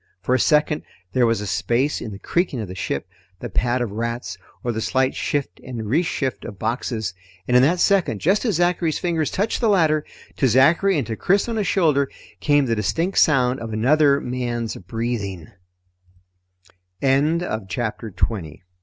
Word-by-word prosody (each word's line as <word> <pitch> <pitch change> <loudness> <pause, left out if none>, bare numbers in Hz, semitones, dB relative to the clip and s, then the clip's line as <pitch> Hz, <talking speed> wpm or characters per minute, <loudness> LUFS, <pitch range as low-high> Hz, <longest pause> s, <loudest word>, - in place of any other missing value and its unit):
For 115 +7 -1
a 130 - +3
second 150 +3 +2 0.3
there 125 -2 +3
was 115 -2 +1
a - - -4
space 120 +9 0
in 110 - -5
the 100 - -7
creaking 170 - -1
of 110 - -4
the 90 - -7
ship, 95 - -3 0.3
the - - -6
pad 120 +2 +1
of 115 - -4
rats, 115 -1 -3 0.3
or 120 - 0
the 110 -1 -3
slight 130 +5 +1
shift 145 -2 -2
and 120 -4 -5
reshift 135 0 -1
of 100 - -8
boxes. 110 -3 -2 0.3
And 125 - +2
in 125 - +7
that 165 +7 +3
second, 185 - +2
just 190 - +2
as 220 -7 +1
Zachary's 175 -2 +1
fingers 165 -4 0
touched 210 +6 -1
the 230 - +3
ladder, 155 -6 +3 0.3
to 135 - +3
Zachary 160 - +4
and 140 - 0
to 110 0 -4
Chris 195 - +2
on 230 -1 -2
his 205 -3 0
shoulder, 150 -7 +2 0.3
came 145 -2 +3
the 115 -2 0
distinct 165 - 0
sound 130 -4 +3
of 115 -1 -6
another 140 +5 +4
man's 120 -3 -3
130 Hz, 165 wpm, -22 LUFS, 115-165 Hz, 0.3 s, in